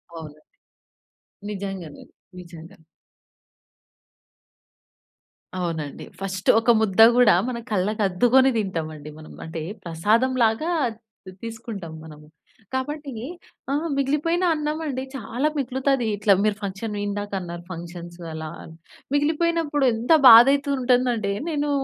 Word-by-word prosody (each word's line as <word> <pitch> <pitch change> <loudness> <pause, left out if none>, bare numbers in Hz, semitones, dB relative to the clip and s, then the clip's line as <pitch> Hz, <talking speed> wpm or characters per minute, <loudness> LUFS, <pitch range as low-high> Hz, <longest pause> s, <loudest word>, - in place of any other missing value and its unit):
అవునండి. 155 -2 -10 1.1
నిజంగానే. 195 -6 -7 0.4
నిజంగా. 170 +1 -12 2.8
అవునండి. 165 -5 -4
ఫస్టు 195 -1 -3
ఒక 235 +1 +3
ముద్ద 215 0 +2 0.2
కూడా 230 -7 +6
మన 240 - -4
కళ్ళకు 210 +2 0
అద్దుకొని 245 +8 +4
తింటాం 185 -7 -2
అండి 150 0 -10
మనం. 155 - -12
అంటే 160 0 -6 0.2
ప్రసాదంలాగా 225 - +1 0.6
తీ 185 - -8
తీసుకుంటాం 220 -7 -7
మనము. 150 -1 -13 0.5
కాబట్టి 290 +2 -4 0.6
ఆహ్, 305 +4 -1
మిగిలిపోయిన 300 +6 0
అన్నం 300 0 -2
అండి, 260 -3 -3
చాలా 245 +4 -2
మిగులుతాది. 265 -1 0
ఇట్లా 205 0 +3
మీరు 215 -1 +1
ఫంక్షన్ 200 +2 -5
ఇందాక 205 0 -4
అన్నారు, 175 -1 -7
ఫంక్షన్సు 175 0 -9
అలా 160 0 -6
అని. 160 - -13 0.4
మిగిలిపోయినప్పుడు 300 -1 +1
ఎంత 235 +8 +2 0.2
బాధయితూ 275 +5 +7
ఉంటుందంటే 245 -5 +1 0.2
నేను 295 -1 -1
220 Hz, 105 wpm, -23 LUFS, 175-265 Hz, 2.8 s, బాధయితూ